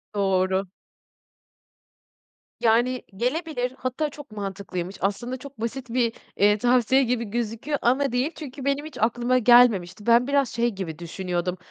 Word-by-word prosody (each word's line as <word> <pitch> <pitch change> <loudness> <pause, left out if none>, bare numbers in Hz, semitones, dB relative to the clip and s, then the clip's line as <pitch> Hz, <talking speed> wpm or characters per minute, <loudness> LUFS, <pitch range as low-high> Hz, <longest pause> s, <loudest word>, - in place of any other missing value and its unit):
Doğru. 190 -1 +1 1.9
Yani 240 +3 +2
gelebilir 255 - -1
hatta 260 +4 -2
çok 290 -4 -12
mantıklıymış. 195 -3 -5
Aslında 220 +7 -2
çok 265 -3 -12
basit 245 +2 -4
bir, 235 -1 +1 0.2
eee, 210 +1 +4
tavsiye 250 +3 +3
gibi 240 -1 -1
gözüküyor 230 +6 -2
ama 265 +2 +2
değil. 255 +5 0
Çünkü 275 -3 -8
benim 280 +1 0
hiç 310 - -9
aklıma 240 +3 +2
gelmemişti. 220 -6 +4
Ben 235 +2 +5
biraz 280 -2 +2
şey 235 +1 0
gibi 185 -7 -6
düşünüyordum; 180 +1 -3
240 Hz, 135 wpm, -25 LUFS, 200-255 Hz, 1.9 s, Ben